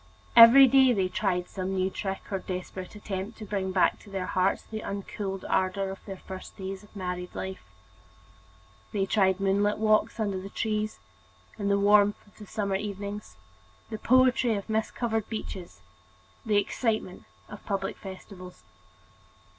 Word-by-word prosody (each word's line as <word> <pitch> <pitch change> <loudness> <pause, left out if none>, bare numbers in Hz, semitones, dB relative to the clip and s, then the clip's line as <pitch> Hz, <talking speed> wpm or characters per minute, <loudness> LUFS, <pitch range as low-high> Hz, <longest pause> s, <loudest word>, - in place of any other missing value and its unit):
Every 235 +4 +11
day 265 0 +5
they 190 -4 0
tried 180 -2 -1
some 190 0 -4
new 190 0 0
trick 195 0 -4
or 195 - -1
desperate 185 +1 -6
attempt 205 +1 -5
to 215 - -8
bring 195 -2 -2
back 185 -1 +2
to 205 - -15
their 190 -2 -3
hearts 185 +1 +1
the 220 -1 -6
uncooled 195 -1 -5
ardor 190 +1 0
of 195 - -10
their 195 -2 -7
first 190 0 -10
days 190 0 -5
of 210 +1 -20
married 180 -2 -5
life. 190 0 -5 1.3
They 195 -2 +1
tried 190 -2 +2
moonlight 200 +2 +2
walks 215 +1 +2
under 200 -3 -1
the 195 - -8
trees, 215 0 -2 0.6
in 200 - -1
the 200 - +3
sweet 200 - 0
warmth 205 0 +4
of 205 - -23
the 210 - -10
summer 200 -2 -1
evenings: 205 +1 -6 0.6
the 220 - -4
poetry 255 -1 +4
of 200 - -5
mist 220 0 -1
covered 225 -3 -1
beaches; 195 -5 -6 0.7
the 210 -1 +3
excitement 215 -2 -1 0.2
of 210 - -11
public 200 -2 -2
festivals. 185 -1 -11
200 Hz, 160 wpm, -28 LUFS, 190-215 Hz, 1.3 s, Every